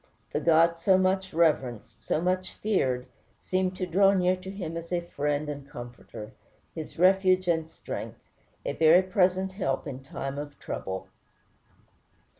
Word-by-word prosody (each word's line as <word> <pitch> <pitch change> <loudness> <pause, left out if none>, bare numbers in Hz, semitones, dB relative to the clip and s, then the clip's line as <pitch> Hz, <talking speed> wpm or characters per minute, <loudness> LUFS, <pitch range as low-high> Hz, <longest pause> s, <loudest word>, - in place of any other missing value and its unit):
The - - 0
God 165 +1 +4
so 190 +1 +4
much 190 0 +1
reverenced, 130 -9 0
so - - 0
much 185 +2 -1
feared, 130 -12 0 0.3
seemed 185 0 -1
to 185 - -1
draw 195 +3 +4
near 185 -1 +3
to 185 +1 -9
him 180 -5 -5
as 170 +1 -6
a 175 -1 +1
friend 150 -3 -2
and 140 -2 -6
comforter, 120 -3 -9 0.4
his 160 -2 -7
refuge 185 +1 +4
and 160 -2 +1
strength, - - -7 0.5
"a - - -1
very 165 +3 +6
present 185 0 +2
help 160 -9 -2
in 135 -3 -6
time 135 +1 -5
of 145 0 -7
trouble." 95 0 -5
170 Hz, 150 wpm, -28 LUFS, 145-185 Hz, 0.5 s, very